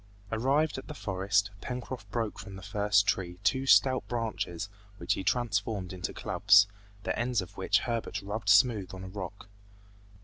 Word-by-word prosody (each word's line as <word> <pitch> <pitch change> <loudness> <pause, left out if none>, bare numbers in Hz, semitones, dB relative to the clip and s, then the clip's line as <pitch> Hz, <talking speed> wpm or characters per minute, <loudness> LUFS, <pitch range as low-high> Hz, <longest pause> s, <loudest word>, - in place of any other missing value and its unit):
Arrived 135 +6 +1
at - - -12
the 150 - -7
forest, 100 -1 0
Pencroft 125 -4 -6
broke 115 -1 -3
from 100 -2 -8
the 95 - -10
first 105 0 +2
tree 90 -3 -1
two 130 +6 +1
stout 130 -1 +5
branches 110 -6 -3 0.3
which - - 0
he - - -4
transformed 105 -3 -1
into 90 -2 -4
clubs, 100 +1 +5 0.4
the - - -1
ends 120 0 +1
of 95 - -6
which - - +2
Herbert 115 -1 -2
rubbed 105 +1 -3
smooth 100 -2 +4
on 95 - -8
a - - -6
rock. 100 +1 -7
105 Hz, 165 wpm, -30 LUFS, 95-120 Hz, 0.4 s, stout